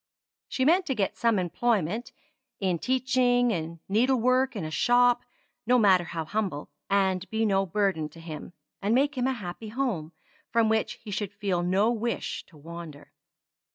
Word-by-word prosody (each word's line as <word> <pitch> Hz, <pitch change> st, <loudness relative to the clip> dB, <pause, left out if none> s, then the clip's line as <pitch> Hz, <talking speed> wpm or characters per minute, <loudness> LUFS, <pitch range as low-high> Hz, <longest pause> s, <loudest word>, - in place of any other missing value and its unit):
She 260 Hz, -, -1 dB
meant 355 Hz, +5 st, +4 dB
to 265 Hz, -, 0 dB
get 200 Hz, -4 st, -1 dB
some 230 Hz, -2 st, +2 dB
employment 215 Hz, +3 st, 0 dB, 0.5 s
in 185 Hz, -4 st, 0 dB
teaching 250 Hz, 0 st, +2 dB
in 165 Hz, -3 st, -4 dB
needlework 255 Hz, +4 st, +2 dB
in 190 Hz, -6 st, -3 dB
a 155 Hz, -, -5 dB
shop 245 Hz, +5 st, +4 dB, 0.5 s
no 250 Hz, +1 st, +5 dB
matter 190 Hz, -6 st, +5 dB
how 165 Hz, -2 st, -4 dB
humble 190 Hz, -6 st, -3 dB, 0.2 s
and 190 Hz, -1 st, +1 dB
be 220 Hz, 0 st, 0 dB
no 195 Hz, -2 st, +2 dB
burden 185 Hz, -5 st, 0 dB
to 165 Hz, -, -15 dB
him, 165 Hz, +1 st, -8 dB, 0.3 s
and 205 Hz, +3 st, +2 dB
make 285 Hz, +3 st, +2 dB
him 255 Hz, 0 st, 0 dB
a 265 Hz, -, +1 dB
happy 210 Hz, -1 st, -7 dB
home, 215 Hz, -, -2 dB, 0.4 s
from 230 Hz, -1 st, +2 dB
which 220 Hz, 0 st, +1 dB
he 215 Hz, -, -11 dB
should 200 Hz, 0 st, -3 dB
feel 195 Hz, -4 st, -1 dB
no 190 Hz, +6 st, +2 dB
wish 235 Hz, 0 st, -3 dB
to 160 Hz, -, -18 dB
wander. 165 Hz, -1 st, -10 dB
210 Hz, 165 wpm, -27 LUFS, 175-245 Hz, 0.5 s, no